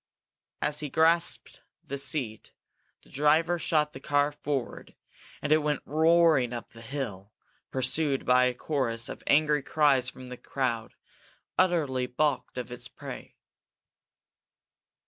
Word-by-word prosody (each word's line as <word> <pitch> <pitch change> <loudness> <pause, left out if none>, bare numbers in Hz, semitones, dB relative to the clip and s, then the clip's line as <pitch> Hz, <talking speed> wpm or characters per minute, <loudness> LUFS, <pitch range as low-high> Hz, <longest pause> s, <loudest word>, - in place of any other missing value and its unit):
As 150 0 0
he 150 - -4
grasped 165 +3 +2 0.2
the 140 +1 -4
seat, 130 -6 -2 0.5
the - - -21
driver 160 +4 +2
shot 150 -2 +1
the 130 - -8
car 145 +1 +1
forward 145 -3 -4 0.5
and 150 - -2
it 155 - +6
went 150 -1 -1
roaring 160 -4 +3
up 120 - -6
the 115 - -14
hill, 115 -6 -5 0.4
pursued 135 +2 0
by 125 0 +5
a 125 -1 0
chorus 120 -5 -1
of - - -7
angry 150 0 +3
cries 135 -3 +2
from 130 -1 -11
the 125 - -7
crowd, 120 -5 -3 0.6
utterly 150 -9 +1
balked 135 +1 -1
of 125 -1 -5
its 125 - -5
prey. - - -10
140 Hz, 130 wpm, -28 LUFS, 125-155 Hz, 0.6 s, it